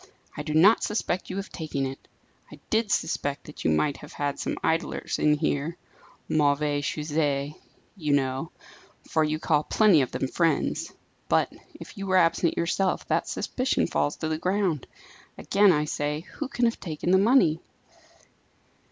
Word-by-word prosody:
"I - - -4
do 155 0 -3
not 195 +8 +6
suspect 210 -4 -2
you 185 - -4
of 195 +1 -5
taking 150 -5 -3
it. 135 0 -7 0.4
I - - -10
did 220 -1 +2
suspect 145 -6 -1
that 150 - -10
you - - +2
might 140 - +1
have 150 - -12
got 145 -1 -2
some - - -3
idlers 165 +1 -1
in 150 0 +4
here, 150 +2 -1 0.5
mauvais 145 -1 +1
sujets, 145 -1 -1 0.4
you 150 -7 -1
know, 135 +2 0 0.6
for 160 - +2
you 155 0 0
call 155 -1 +1
plenty 205 -6 +4
of 130 - -1
them 135 - -2
friends; 165 +4 0 0.4
but, - - +2 0.2
if 205 - -11
you 195 - -4
were 185 0 +3
absent 170 -1 +2
yourself, 185 +3 0
that - - +1
suspicion 255 +1 -1
falls 145 -3 0
to 160 - -4
the 155 0 -2
ground. 185 -6 0 0.5
Again 200 0 +4
I 150 -2 +1
say, 150 0 -2
who 195 - -6
can 245 -2 0
have 230 - 0
taken 165 0 -3
the 190 - +6
money?" 195 - +4
155 Hz, 165 wpm, -26 LUFS, 145-185 Hz, 0.6 s, not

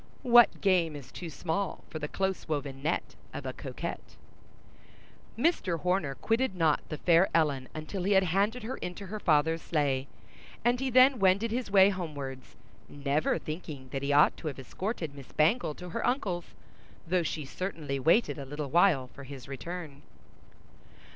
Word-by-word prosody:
What 240 -2 +6
game 175 -6 +2
is 140 -3 -10
too 175 - -7
small 175 +6 -3
for 155 - -5
the 150 - -3
close 190 +3 -2
woven 140 -3 -3
net 155 +4 -1 0.2
of - - -5
a - - -3
coquette? - - -6 1.2
Mr. 195 - +1
Horner 180 -7 0
quitted 225 - 0
not 160 -4 +2
the 155 - -4
fair 170 +4 +4
Ellen 145 -5 +1
until 155 +5 -5
he 200 +3 +2
had 190 0 +5
handed 200 +7 0
her 240 +4 -4
into 180 +3 -6
her 210 +3 -5
father's 160 -1 +2
sleigh; 140 -4 0 0.6
and 240 +1 +3
he 265 0 -1
then 255 +1 +6
wended 195 +4 +3
his 245 -1 -2
way 195 -1 +7
homewards, 145 -9 -6 0.3
never 145 +1 0
thinking 155 -4 -7
that 135 +1 -3
he 140 +1 -1
ought 145 +1 +5
to 160 - -6
have 145 - -4
escorted 165 - -4
Miss 140 -2 -12
Bangle 155 +1 +2
to 180 0 -9
her 230 +7 -3
uncle's, 195 -9 -1 0.6
though 180 +1 +2
she 160 -2 -3
certainly 150 -4 -4
waited 165 - +3
a 140 - -6
little 145 0 -5
while 170 -6 +4
for 140 - -10
his 135 -2 -9
return. 150 +1 -7
165 Hz, 165 wpm, -29 LUFS, 145-195 Hz, 1.2 s, way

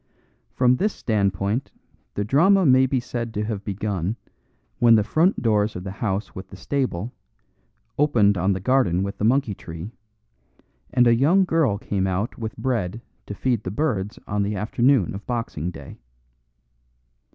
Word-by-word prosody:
From 125 0 +3
this 210 +6 0
standpoint 100 +1 -1 0.5
the 100 - -1
drama 175 - +4
may 130 -1 +5
be 130 0 0
said 120 -1 -5
to 105 - -1
have 105 -2 -4
begun 100 -1 -2 0.6
when 115 -1 +6
the 105 - +3
front 165 - +1
doors 105 -2 +1
of 90 - -6
the 95 - -5
house 100 0 -3
with 95 0 -8
the - - -10
stable 115 +1 -3 0.9
opened 115 -9 +3
on 95 +2 +1
the 95 - -3
garden 95 -5 +2
with 100 0 -5
the - - -2
monkey 125 -2 +2
tree, 85 +2 -8 1.0
and 125 0 +4
a 120 - +5
young 160 +11 +4
girl 160 - +1
came 100 -2 -2
out 95 +6 -2
with 110 -2 -6
bread 115 -5 -2 0.3
to 105 - -6
feed 120 0 0
the - - -4
birds 105 -3 -2
on 105 0 -1
the 100 +1 -1
afternoon 120 - +2
of 100 +1 -7
Boxing 115 -9 -3
Day. 70 -6 -11
110 Hz, 165 wpm, -23 LUFS, 100-125 Hz, 1.0 s, when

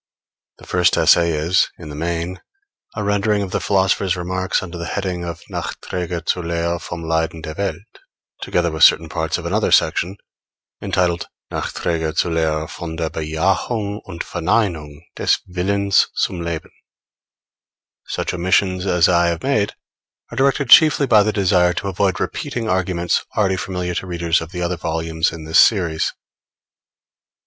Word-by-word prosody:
The - - -15
first 90 -1 +2
essay 85 0 +5
is, 80 +3 +2
in 80 -3 -10
the 75 - -7
main, 85 +3 -3 0.5
a 105 - -2
rendering 105 0 +1
of 95 - -6
the - - 0
philosopher's 95 -1 +1
remarks 95 +2 -1
under 85 -1 -7
the 85 - -4
heading 90 -1 -3
of 85 0 -6
Nachträge 90 -2 -4
zur 90 - +1
Lehre 85 0 -1
vom 85 -1 -6
Leiden 80 0 -1
der 80 - -5
Welt, 100 +1 -5 0.4
together 85 -1 0
with 80 - 0
certain 80 0 +6
parts 80 +1 -1
of - - -8
another - - 0
section 95 +4 +2 0.6
entitled 85 -2 0 0.2
Nachträge 80 -2 -2
zur 85 - +1
Lehre 80 -1 0
von 85 -1 -7
der 80 -1 -2
Bejahung 95 +7 -1
und 85 - -6
Verneinung 85 -5 -1
des - - +2
Willens 100 +2 +2
zum 90 -3 -1
Leben. 85 -2 -4 1.4
Such - - -3
omissions 95 +1 +1
as 90 -3 +4
I 85 -1 +3
have 85 -1 -2
made 110 -7 +1 0.6
are - - -7
directed 135 -1 +1
chiefly 155 -3 +7
by 110 -5 +5
the 110 +1 +1
desire 90 -3 +3
to 100 - -4
avoid 95 0 0
repeating 115 -2 -3
arguments 90 -2 0
already 95 -3 +2
familiar 90 -1 -3
to 95 - -4
readers 85 -1 0
of 80 0 -8
the 90 -2 -4
other 85 0 -1
volumes 80 0 -1
in 80 -1 -8
this 80 +1 +3
series. 85 -7 +3
90 Hz, 155 wpm, -20 LUFS, 80-95 Hz, 1.4 s, chiefly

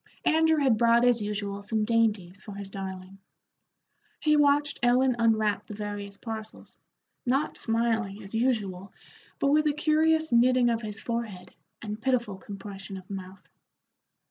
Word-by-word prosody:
Andrew 320 0 +4
had 265 -7 +3
brought 235 0 +5
as 245 -2 +3
usual 205 -1 -3
some 215 +1 0
dainties 210 -5 0
for 205 - -9
his 200 -1 -6
darling. 190 0 -7 1.0
He 305 -1 +3
watched 290 0 +3
Ellen 250 +1 +3
unwrap 220 -3 +2
the 210 - -7
various 205 -1 -6
parcels, 220 -1 -8 0.4
not 270 +4 0
smiling 225 -3 -1
as 195 - -10
usual, 210 -6 -1 0.5
but 280 - +1
with 305 +1 +4
a 295 - +2
curious 315 +1 +2
knitting 245 0 +4
of 230 0 -1
his 215 -1 -6
forehead 220 -6 -5 0.3
and 210 0 -5
pitiful 235 -6 0
compression 195 0 -8
of 185 +1 -12
mouth. 190 -1 -8
225 Hz, 145 wpm, -27 LUFS, 200-250 Hz, 1.0 s, brought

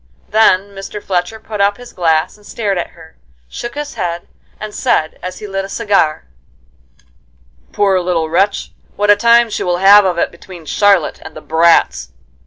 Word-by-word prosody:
Then 200 -2 +3
Mr. 195 +1 -8
Fletcher 190 +2 -3
put 215 -2 -5
up 200 0 +2
his 245 0 -13
glass 160 -3 0
and 210 - -22
stared 205 -3 -3
at - - -4
her, 160 -1 -16 0.3
shook 240 - -7
his 295 0 -5
head, 170 0 -4 0.3
and 215 -1 -7
said, 160 -12 -1
as 185 0 -6
he - - -9
lit 195 -1 -3
a 195 - -8
cigar: 200 - 0 1.5
"Poor 195 -2 +2
little 175 -3 -1
wretch, 195 +5 0 0.2
what 205 +1 +3
a - - +6
time 235 +2 +4
she - - -3
will 175 -1 0
have 200 +3 +7
of 180 -3 -1
it - - 0
between 170 -1 -13
Charlotte 200 0 +1
and 160 - -11
the 155 - -9
brats!" 165 +2 +2
195 Hz, 180 wpm, -15 LUFS, 170-210 Hz, 1.5 s, have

